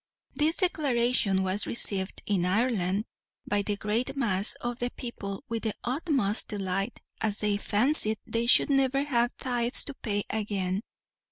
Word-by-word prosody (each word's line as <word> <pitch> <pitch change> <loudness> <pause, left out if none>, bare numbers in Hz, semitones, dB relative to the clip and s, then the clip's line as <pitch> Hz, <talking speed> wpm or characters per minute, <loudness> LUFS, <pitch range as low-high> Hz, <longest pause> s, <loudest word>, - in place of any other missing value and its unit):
This 310 +2 +2
declaration 245 - +2
was 190 +2 +1
received 195 -4 +3
in 195 -4 -1
Ireland 200 0 -1 0.4
by 205 0 -1
the 205 +1 -3
great 215 +6 -3
mass 210 -6 +3
of 240 0 -6
the 245 - -3
people 200 -6 -8
with 230 0 -5
the 220 -2 -4
utmost 255 - +1
delight, 195 +1 -4 0.2
as 210 -2 +2
they 210 -1 0
fancied 220 +1 +3
they 230 +1 -3
should 250 - +6
never 270 0 0
have 240 -4 -2
tithes 245 -1 +2
to 285 - -3
pay 205 -6 -4
again. 200 -3 -3
220 Hz, 150 wpm, -26 LUFS, 200-250 Hz, 0.4 s, should